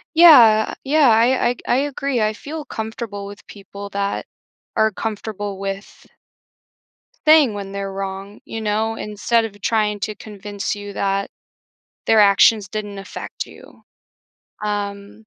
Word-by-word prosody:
Yeah, 240 -11 +7
yeah, 285 -1 +4
I 225 +1 +5
I 260 - 0
I - - +4
ag 245 - -4
I - - +3
agree, 275 -3 -1
I 215 0 +1
feel 295 +6 -7
comfortable 220 -2 -5
with 200 +1 -11
people 200 0 -10
that 200 0 -2 0.5
are 220 0 +3
comfortable 205 -1 -5
with 195 0 -6 1.2
saying 305 -7 +6
when 200 -1 -6
they're 195 0 -4
wrong, 195 +1 -6
you 225 -1 -5
know, 220 +1 0
instead 220 +2 0
of 205 -2 -8
trying 210 -2 0
to 215 +1 -3
convince 205 -1 -5
you 205 0 -8
that 195 0 -1 0.8
their 225 - +4
actions 200 +1 +5
didn't 205 -2 -5
affect 195 - -7
you. - - -16 0.8
Um, 205 +1 -4
210 Hz, 140 wpm, -20 LUFS, 200-225 Hz, 1.2 s, Yeah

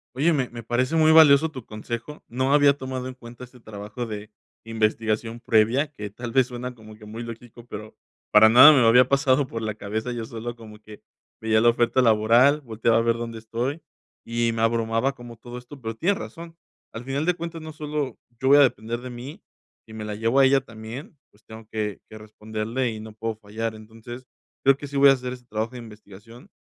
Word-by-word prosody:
Oye, 150 +6 +2
me 135 -6 0
me 120 0 -8
parece 125 +6 -1
muy 160 -1 +5
valioso 160 -1 +7
tu 130 -6 -10
consejo. 115 +6 -7
No 130 +3 0
había 145 -1 +5
tomado 130 -1 -5
en 130 - -8
cuenta 120 0 -11
este 125 0 -19
trabajo 105 +2 -7
de 105 -1 -7 0.3
investigación 115 +1 -1
previa 120 +7 +2
que, 105 -7 -8
tal 120 +2 -7
vez, 130 +1 +4
suena 125 0 -7
como 110 -2 -14
que 105 0 -15
muy 110 +3 -7
lógico, 115 0 -11
pero 110 -2 -9 0.3
para 105 +1 +7
nada 130 +7 +9
me 130 -6 +4
había 125 +2 +6
pasado 140 0 +2
por 115 -1 -6
la 110 -1 -2
cabeza. 110 +4 -4
Yo 120 -2 -4
solo 115 +1 -6
como 110 -2 -13
que 105 0 -14 0.4
veía 110 0 +2
la 120 - +6
oferta 120 +2 +1
laboral, 120 +6 +4
volteaba 115 -2 0
a - - +3
ver 115 0 +1
dónde 115 -1 -6
estoy 120 +7 -4 0.4
y 115 0 -1
me 115 - -3
abrumaba 115 +3 +1
como 120 -1 -11
todo 120 +2 -10
esto, 125 +3 -12
pero 115 -1 -5
tienes 195 - 0
razón, 165 -1 -9 0.4
al 115 - -7
final 135 +4 -2
de 180 - +3
cuentas, 165 -1 -7
no 155 -1 -8
solo 150 -2 -4 0.2
yo 130 - +1
voy 145 - +8
a 145 - +7
depender 120 -2 0
de 125 - -7
mí 125 +4 -9 0.5
y 110 - -13
me 110 -1 -6
la 105 - -4
llevo 115 +5 0
a 135 - +7
ella 135 0 +4
también, 115 +5 -10
pues, 105 - -28
tengo 110 0 -12
que 105 -2 -3
que 110 - -12
responderle 110 +3 -4
y 110 - -7
no 110 0 -10
puedo 110 +1 -4
fallar, 110 +1 -5
entonces, 115 +3 -11 0.4
creo 135 0 +5
que 145 - -8
sí 140 - -10
voy 140 0 +7
a - - +7
hacer 125 -1 -4
ese 125 -1 -12
trabajo 110 +1 -3
de 125 - -9
investigación. 110 - -14
120 Hz, 215 wpm, -24 LUFS, 110-130 Hz, 0.5 s, nada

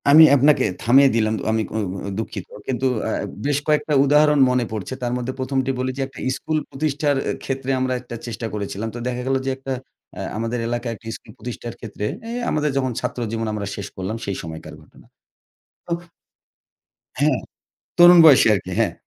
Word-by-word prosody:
আমি 155 +3 +10
আপনাকে 145 +1 +4 0.2
থামিয়ে 135 +4 +6
দিলাম। 110 -1 +2 0.2
আমি 110 0 +1 0.2
অ - - +1 0.4
দুঃখিত। 110 -4 -5 0.2
কিন্তু 130 0 -1 0.2
আ - - -1 0.3
বেশ 145 -1 +2
কয়েকটা 150 0 +2
উদাহরণ 150 +1 +4
মনে 125 -1 +1
পড়ছে। 110 +2 -4
তার 120 0 -1
মধ্যে 125 +1 -3
১মটি 130 0 0
বলি 130 0 -1
যে, - - -2
একটা 135 - -13 0.2
স্কুল 155 - -2
প্রতিষ্ঠার 145 0 0 0.3
ক্ষেত্রে 135 0 -2
আমরা 130 0 0
একটা 120 -1 -8
চেষ্টা 115 0 -5
করেছিলাম। 105 +1 -4
তো - - -5
দেখা 125 0 -2
গেল 135 - +2
যে, - - 0
একটা 135 0 -6 0.5
আ - - -4 0.2
আমাদের 115 +2 -2
এলাকায় 120 0 -2
একটি 115 - -14
স্কুল 110 - -16
প্রতিষ্ঠার 120 -1 -7
ক্ষেত্রে 105 -2 -5 0.2
এ - - -4 0.2
আমাদের 150 0 +1
যখন 130 -1 0
ছাত্রজীবন 115 -2 -3
আমরা 105 -2 -3
শেষ 100 - -5
করলাম 95 +4 -4
সেই 100 -1 -3
সময়কার 80 0 -8
ঘটনা। - - -20 0.9
ও - - 0 1.3
হ্যাঁ, 145 -2 +3 0.6
তরুণ 175 0 +9
বয়সে 140 -7 +8
আরকি, 95 -1 -5
হ্যাঁ। - - +2
125 Hz, 175 wpm, -22 LUFS, 115-140 Hz, 1.3 s, আমি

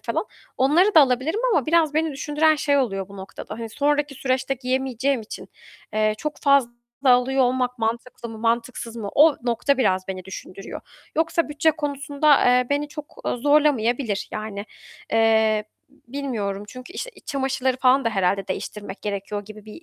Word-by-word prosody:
falan. - - -2 0.3
Onları 335 +10 +4
da 320 - +9
alabilirim 275 - +2
ama 295 - +2
biraz 320 -2 +3
beni 315 0 +1
düşündüren 300 +3 +2
şey 285 -1 +2
oluyor 195 -7 -1
bu 200 - -12
noktada, 190 +2 -8
hani, 230 -1 -5
sonraki 290 +3 0
süreçte 260 0 -1
giyemeyeceğim 260 0 -1
için, 215 - -9 0.4
eee, 215 0 +2
çok 300 +3 -4
fazla 280 -4 +4 0.4
alıyor 260 +1 +4
olmak 250 0 0
mantıklı 235 +1 -3
mı 225 - -8
mantıksız 230 +1 -2
mı, 215 -3 -4
o 300 0 +6
nokta 245 +3 +1
biraz 190 -6 +1
beni 185 -1 -5
düşündürüyor. 190 0 -8 0.4
Yoksa 330 0 +1
bütçe 295 +2 +2
konusunda, 290 -1 +1
eee, 250 0 +4
beni 290 +1 0
çok, 300 0 -9
eee, - - 0
zorlamayabilir, 245 -5 +2
yani, 215 -1 -5 0.5
eee, 220 -1 +3 0.2
bilmiyorum 240 -8 -5
çünkü 255 +8 -10
işte 465 +4 -5
iç - - -19
çamaşırları 265 -3 -1
falan 260 +1 +3
da 230 - +1
herhâlde 195 -1 0
değiştirmek 205 -1 -6
gerekiyor 205 0 -4
gibi 215 0 -12
bir 215 +9 -11
255 Hz, 160 wpm, -23 LUFS, 220-285 Hz, 0.5 s, da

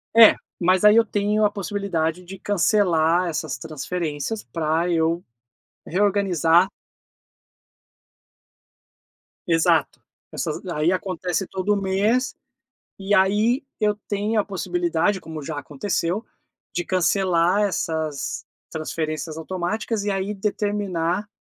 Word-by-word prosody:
É, 225 -1 +9 0.3
mas 185 +3 +3
aí 210 +1 +8
eu 230 - +6
tenho 210 0 0
a 210 - +5
possibilidade 185 -5 -2
de 190 +2 -9
cancelar 180 -4 +2
essas 155 -2 -3
transferências 155 +5 -4
pra 165 +1 -1
eu 165 0 +1 0.6
reorganizar 185 -3 +3 2.8
Exato. 165 -2 +2 0.3
Essas - - -4
aí 165 -1 +1
acontece 185 -1 -2
todo 195 +2 0
mês, 210 +7 +1 0.6
e 195 +1 -1
aí 210 +7 +3 0.2
eu 210 -1 +2
tenho 210 +2 0
a 205 - 0
possibilidade, 210 - 0
como 160 -3 -8
já 150 +1 -5
aconteceu, 170 - -2 0.5
de 175 - -2
cancelar 185 +1 +2
essas 160 -6 -2 0.2
transferências 155 0 -4
automáticas 190 +6 -2
e 205 - 0
aí 195 +1 -2
determinar 200 -2 -1
185 Hz, 105 wpm, -23 LUFS, 165-205 Hz, 2.8 s, É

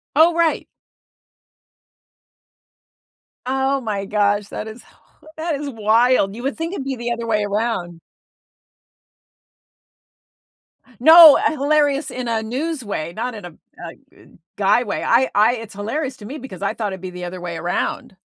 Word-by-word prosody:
Oh, 325 +3 +5
right. 335 -2 0 2.8
Oh 265 +1 0
my 205 -4 -3
gosh, 205 0 0
that 215 - -6
is 220 +3 -10
hi - - -24 0.4
that 320 -1 -2
is 285 0 -5
wild, 225 -2 +2
you 240 - -8
would 275 +3 -3
think 330 +3 -4
it'd 275 - -4
be 270 -1 -3
the 240 0 -4
other 235 -1 -4
way 210 -2 +1
around. 200 -5 -3 3.0
No, 320 0 +10
eh, - - +1
hilarious 290 0 +1
in 250 -1 -5
a 225 -1 -1
news 270 +5 -4
way, 170 -5 -5
not 245 +4 -4
in 205 - -9
a 175 - -9 0.3
a - - -7 0.3
eh, - - -19 0.3
guy 205 +4 +3
way, 210 - -4
I 255 +3 +3
I 215 +4 +3
it's 225 -2 -9
hilarious 260 +7 -4
to 205 - -12
me 280 +7 -7
because 235 - -10
I 200 - -1
thought 210 -4 -3
it'd 190 - -7
be 185 - -6
the 180 0 -9
other 180 +1 -7
way 175 -1 -6
around. 175 +2 -3
230 Hz, 160 wpm, -20 LUFS, 205-275 Hz, 3.0 s, No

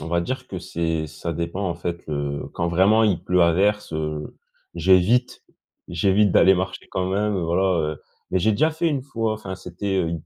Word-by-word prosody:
on 75 - -7
va 85 0 +1
dire 130 +7 -4
que 95 - -5
c'est, 80 -2 -2
ça 80 +2 -5
dépend 85 +4 -3
en 85 - -2
fait, 85 0 -5
heu, 70 -1 -3
quand 85 - -1
vraiment 95 +6 +4
il 95 -6 +1
pleut 90 -1 +2
à 85 -1 +4
verse, 105 +2 +1
heu, 75 -1 -4 0.4
j'évite, 95 +8 +3 0.5
j'évite 95 +3 +2
d'aller 95 0 +6
marcher 90 +1 -4
quand 95 -1 -1
même, 100 +1 0
voilà, 85 +2 +1 0.3
heu, - - -18 0.3
mais 95 - +2
j'ai 110 +5 +2
déjà 155 +10 +2
fait 160 +2 0
une 140 -4 -1
fois, 115 -5 -2
enfin 100 -3 -6
c'était, 95 +2 -4
heu, 85 -2 0
90 Hz, 200 wpm, -23 LUFS, 85-105 Hz, 0.5 s, d'aller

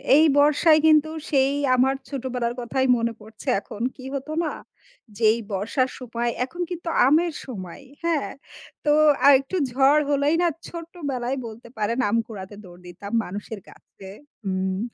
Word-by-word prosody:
এই 310 +2 +6
বর্ষায় 305 +2 +5
কিন্তু 310 0 +5 0.2
সেই 270 -1 +3 0.2
আমার 265 +2 +3
ছোটবেলার 250 -3 -3
কথাই 260 +2 -1
মনে 230 0 -1
পড়ছে 220 +4 -14
এখন। 210 +1 -10
কি 255 - -12
হতো 275 +3 -5
না? 315 - -1 0.7
যে - - -11
এই 235 - -3
বর্ষার 225 +7 0
সময় 240 -1 -3 0.2
এখন 345 +7 -8
কিন্তু 345 -1 -5 0.2
আমের 325 +4 +3
সময়, 195 -2 -8 0.2
হ্যাঁ? 330 -4 0 0.5
তো 295 - +4 0.3
আর 280 - +9
একটু 275 +7 -6 0.2
ঝড় 275 +4 +4
হলেই 285 +2 +2
না 350 - +3 0.2
ছোট্ট 335 -1 -9 0.2
বেলায় 250 +1 -2
বলতে 230 +2 -11
পারেন 215 +3 -1
আম 230 - +2
কুড়াতে 205 -2 -9
দৌড় 180 -1 -14
দিতাম 180 +3 -9
মানুষের 205 +3 -7
গাছে 190 -1 -15 0.4
উম 190 0 -1
255 Hz, 155 wpm, -24 LUFS, 215-290 Hz, 0.7 s, আর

